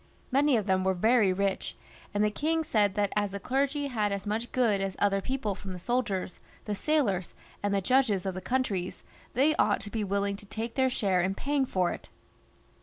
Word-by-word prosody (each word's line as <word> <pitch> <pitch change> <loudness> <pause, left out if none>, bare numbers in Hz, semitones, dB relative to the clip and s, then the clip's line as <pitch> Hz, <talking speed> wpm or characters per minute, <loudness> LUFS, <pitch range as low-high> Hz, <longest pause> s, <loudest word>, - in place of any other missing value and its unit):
Many 275 -1 +4
of 210 - -1
them 190 -2 +2
were 190 0 +2
very 220 +1 +4
rich, 195 +1 -1 0.4
and 205 0 +1
the 210 - +2
kings 320 +6 0
said 205 -3 +2
that 205 -1 0
as 205 -1 +1
the 200 +1 -5
clergy 275 +6 0
had 215 -7 0
as 200 0 -3
much 220 +3 -2
good 225 -6 +2
as 195 -1 -2
other 195 -1 +2
people 255 -3 -2
from 195 0 -7
the - - -6
soldiers, 195 -3 -2 0.3
the 210 - -2
sailors, 205 - 0 0.3
and 205 - 0
the 200 -1 +1
judges 220 -4 +2
of 190 - -1
the 185 - -5
countries, 205 -8 -2 0.3
they 290 +5 +4
ought 205 - +3
to 205 - -7
be 220 -1 -1
willing 200 0 -1
to 205 - -13
take 225 +3 -4
their 260 -1 +2
share 195 -7 +1
in 190 +2 0
paying 280 +1 0
for 180 -5 +1
it. - - -8
205 Hz, 210 wpm, -29 LUFS, 195-255 Hz, 0.4 s, Many